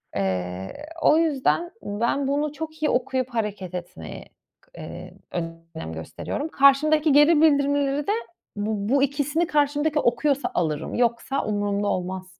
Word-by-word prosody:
Eee, 95 - -3 0.2
o 305 - +5
yüzden 325 +2 +1
ben 235 +7 -1
bunu 290 +2 0
çok 315 0 -7
iyi 300 - +3
okuyup 255 0 0
hareket 210 -6 -3
etmeyi, 180 -1 -7 0.5
eee, - - -8 0.2
k 175 - -1 0.3
önem 80 - -6
gösteriyorum. 80 - -5
Karşımdaki 300 +2 +4
geri 295 +2 +6
bildirimleri 285 -1 +2
de - - +2 0.4
bu 205 0 -2
bu 275 -1 +4
ikisini 290 +4 0
karşımdaki 295 +1 +1
okuyorsa 280 +3 +1
alırım. 155 -4 -1
Yoksa 240 +3 0
umurumda 205 -1 -1
olmaz. 185 0 -4
270 Hz, 130 wpm, -24 LUFS, 205-295 Hz, 0.5 s, geri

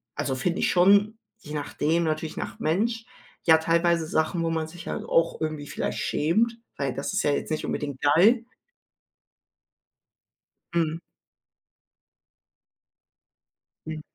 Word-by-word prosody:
also, 135 - -1
finde 175 +7 -1
ich - - +2
schon 200 +4 +4 0.2
je 155 -8 -10
nachdem 150 +3 0
natürlich 155 0 -2
nach - - -5
Mensch, 225 +8 0 0.4
ja 160 -1 +6
teilweise 170 0 +2
Sachen, 160 +2 0
wo 165 - 0
man 160 -1 -1
sich 175 +2 -11
halt - - -3
auch 165 0 +1
irgendwie 155 -2 -3
vielleicht - - -3
schämt, 225 +10 +1 0.2
weil 140 -2 -1
das 140 - -4
ist 195 - +1
ja 145 - +2
jetzt 145 - -2
nicht 155 - -1
unbedingt 140 -3 -4
geil. 195 +12 +5 2.3
Mhm. 165 -1 0 2.9
Mhm. 155 -1 -5
165 Hz, 125 wpm, -26 LUFS, 155-180 Hz, 2.9 s, ja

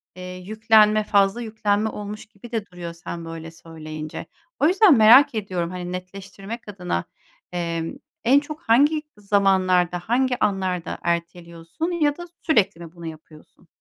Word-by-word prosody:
eee, 180 0 -8
yüklenme, 215 +2 +3
fazla 200 +2 +2
yüklenme 215 -1 0
olmuş 210 0 -7
gibi 220 +2 -15
de 220 -3 -2
duruyor 175 -2 -8
sen 170 0 -7
böyle 165 0 -8
söyleyince. 155 -2 -8 0.3
O 295 - +4
yüzden 375 -1 +6
merak 235 +5 +7
ediyorum, 185 -5 -2
hani, 180 -1 -5
netleştirmek 195 +4 -8
adına, 180 - -3 0.5
emm, 170 -2 -3 0.3
en 265 +4 +5
çok 300 +2 -9
hangi 290 +6 +3 0.2
zamanlarda, 190 -3 +2
hangi 250 +6 0
anlarda 185 -3 -1
erteliyorsun 170 - -3
ya 300 -4 +1
da 345 - -7 0.2
sürekli 210 - +1
mi 165 - -14
bunu 170 - -10
yapıyorsun? 155 +2 -13
195 Hz, 140 wpm, -23 LUFS, 170-225 Hz, 0.5 s, merak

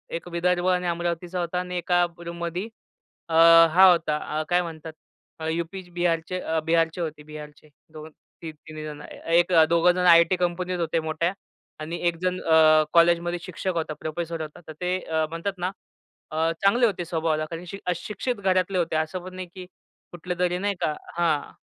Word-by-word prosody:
एक 170 - -6
विदर्भ 180 +1 0
आणि 180 -1 +1
अमरावतीचा 175 +1 -2
होता 175 +1 -2
आणि 180 0 -4
एका 175 0 +2 0.2
रूममध्ये 170 +4 -4 0.6
अ, - - -4 0.4
हा 190 +2 +8
होता 165 -3 +1 0.2
अ, - - -2
काय 175 0 +3
म्हणतात 160 -2 -8 0.5
अ, 160 - -4
यूपी-बिहारचे 175 0 -2
अ, 160 -2 -1
बिहारचे 165 +1 +1
होते, 155 -2 -5
बिहारचे. 150 0 -11 0.2
2 155 0 -9 0.3
ती 165 - -6
3 155 0 -11
जणं. 150 -1 -8
ए 165 +1 0
एक 175 +1 +1
अ, 160 -1 +7
दोघं 170 +1 +4
जणं 180 0 0
आयटी 170 +2 +6
कंपनीत 180 0 -2
होते 165 -1 0
मोठ्या 160 +3 -1 0.5
आणि 160 +3 -5
एक 170 -1 0
जण 185 0 -1
अ, 155 -1 +5
कॉलेजमध्ये 170 +1 +3
शिक्षक 185 +1 -4
होता, 160 -2 -2
प्रोफेसर 165 +1 -4
होता, 155 +1 -8
तर 155 - -8
ते 180 +1 0
अ, 160 -1 0
म्हणतात 165 +5 -3
ना 180 +1 -2 0.6
अ, 160 +1 +1
चांगले 220 +5 +4
होते 180 -6 -1
स्वभावाला 160 -2 -1
कारण 165 +2 -7
शि 195 +3 -7
अ, 180 - +1
शिक्षित 210 +8 -4
घरातले 190 -2 0
होते, 170 -2 0
असं 160 +3 -2
पण 185 0 -9
नाही 185 -1 -6
की 185 - -8 0.5
कुठलं 180 +1 -5
तरी, 180 0 +1
नाही 200 +1 -1
का 150 - 0 0.2
हां. 160 -4 0
170 Hz, 185 wpm, -25 LUFS, 160-180 Hz, 0.6 s, हा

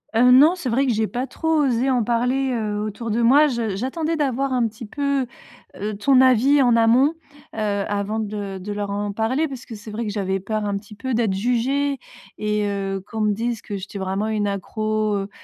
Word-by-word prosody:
Heu, 250 +2 +6
non, 290 +7 +7
c'est 285 -9 -4
vrai 265 +4 +2
que 245 - +1
j'ai 220 0 0
pas 250 +2 -3
trop 320 +4 -4
osé 255 -1 +1
en 250 -3 +2
parler, 250 +4 0
heu, 210 -3 -2
autour 215 +2 -4
de 230 +3 0
moi. 285 +6 +6
J 230 -6 -2
j'attendais 310 - -2
d'avoir 275 -3 0
un 245 -2 +2
petit 220 +1 -9
peu, 280 +2 -1 0.5
heu, 210 +1 -4
ton 260 +4 +4
avis 260 +3 +5
en 245 -2 +4
amont, 240 +7 +4 0.4
heu, - - -10
avant 205 +1 -1
de 205 -2 -4
de 205 +3 -6
leur 205 -1 -3
en 205 0 -2
parler 255 +9 0
parce 265 -4 -8
que 230 - -9
c'est 210 +1 -10
vrai 225 +3 -3
que 205 - -3
j'avais 195 -2 -1
peur 215 +2 -3
un 200 -1 -1
petit 210 +1 -11
peu 260 +4 -3
d'être 220 -4 +1
jugée 255 +6 0 0.4
et 210 -1 0
heu, 195 -1 -2
qu'on 220 -1 -4
me 210 -1 +2
dise 230 +1 -2
que 205 - -5
j'étais 195 +1 -8
vraiment 195 +2 -2
une 215 -1 0
accro, 215 +2 -1
heu 195 0 -3
225 Hz, 220 wpm, -22 LUFS, 205-260 Hz, 0.5 s, non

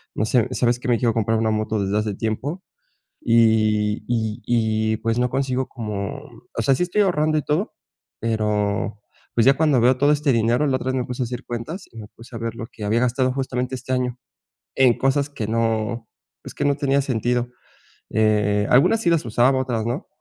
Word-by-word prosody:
No - - 0
sé, 120 +1 +2
¿sabes?, 120 -1 +1
que 125 - -6
me 120 - +3
quiero 120 -2 +2
comprar 110 0 +1
una 110 -1 +1
moto 110 -1 -1
desde 100 +2 0
hace 105 -2 -2
tiempo 135 - -3 0.6
y 110 -2 +2
y 115 -1 -2
y, 110 -2 +1
pues, 115 +2 -1
no 125 0 +1
consigo 130 0 -1
como 105 -6 -5 0.4
o - - +1
sea, 135 - +4
sí 155 - 0
estoy 180 +4 +1
ahorrando 155 -4 +1
y - - +1
todo, 160 +8 -1 0.5
pero, 105 -2 -1 0.4
pues, 115 - +3
ya 135 +1 +6
cuando 150 -4 +3
veo 125 +2 +4
todo 145 +3 +3
este 145 -2 +1
dinero, 115 +5 +2
la 135 - +1
otra 130 - -6
vez 130 - 0
me 125 -2 -1
puse 125 +1 -3
a - - -2
hacer 125 +1 -6
cuentas 150 - -6
y 115 - -15
me 105 - -9
puse 115 +2 -14
a - - -5
ver 115 0 -3
lo 115 -1 -6
que 110 - -11
había 110 +3 +2
gastado 125 +1 +1
justamente 130 -1 -2
este 130 +1 -4
año 125 -1 -1 0.6
en 130 -3 +5
cosas 135 +1 +1
que 115 -7 -4
no, 115 0 -1 0.3
pues, - - -10
que - - -2
no 140 -1 +2
tenía 140 -1 +1
sentido, 120 -1 -1 0.6
eh, 105 -1 +2
algunas 145 - +4
sí 175 - +2
las 165 -5 +2
usaba, 120 +4 +3
otras 120 -4 -2
no, 120 +5 -3
120 Hz, 210 wpm, -22 LUFS, 110-130 Hz, 0.6 s, ya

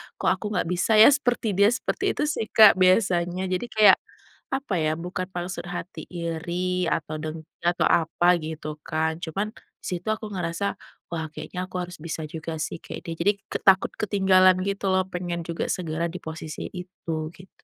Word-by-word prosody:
“Kok - - +1
aku - - -2
nggak 175 - 0
bisa 185 +5 +2
ya 220 +5 +9
seperti 245 -6 +1
dia?” 200 +2 +4
Seperti 375 - 0
itu - - 0
sih, 295 -7 -1
Kak, 215 -4 +7
biasanya. 185 -1 +3
Jadi 210 +7 -1
kayak, 215 -2 +6 0.5
apa 265 - -1
ya, 155 0 0
bukan 180 +2 -4
maksud 180 0 -4
hati 180 +1 -7
iri 175 +2 -2
atau 155 -1 -2
dengki 155 0 -8
atau 175 +1 +2
apa 170 +2 +3
gitu 155 -1 -6
kan, 160 +1 -1
cuman 200 +7 -3
di - - -20
situ 180 +3 -3
aku 215 0 -1
ngerasa, 175 +2 -2 0.4
“Wah 160 -2 -3
kayaknya 180 +4 -6
aku 185 - -5
harus 175 -3 -5
bisa 160 -1 -4
juga 160 +1 -6
sih 160 +1 -4
kek - - -8
dia,” 165 - -4
jadi 200 +5 +1
ke - - -4
takut 190 -1 +4
ketinggalan 190 -3 +4
gitu 200 0 -1
loh. 185 0 +2
Pengen 175 -2 -4
juga 170 -1 -3
segera 170 -1 -2
di 175 - -6
posisi 160 -2 -7
itu, 165 -3 -5
gitu. 185 +2 -15
180 Hz, 180 wpm, -25 LUFS, 165-195 Hz, 0.5 s, ya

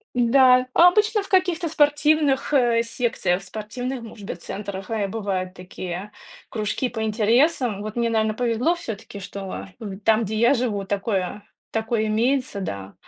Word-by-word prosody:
Да, 255 +1 +5
обычно 420 +5 +5
в - - -10
каких-то 360 -3 +2
спортивных, 295 -2 +2
э, 240 -4 +3
секциях, 230 -6 -1
спортивных, 230 +6 -5
может 215 -3 -10
быть, 170 - -6
центрах, 195 0 -6
э, 215 -3 0
бывают 190 -3 -3
такие 180 +2 -7 0.4
кружки 215 +3 -2
по 225 -2 -5
интересам. 230 +1 +2
Вот 215 0 -6
мне, 235 -1 0
наверно, 220 -1 +1
повезло 245 +7 +1
всё-таки, 225 - -7
что 195 0 -7
в 200 -4 -6
там, 220 +2 +3
где 220 +1 -3
я 235 +4 +4
живу, 230 -6 -1
такое 200 0 -2 0.3
такое 220 0 0
имеется, 235 0 0
да. 100 - -5
225 Hz, 145 wpm, -23 LUFS, 200-255 Hz, 0.4 s, Да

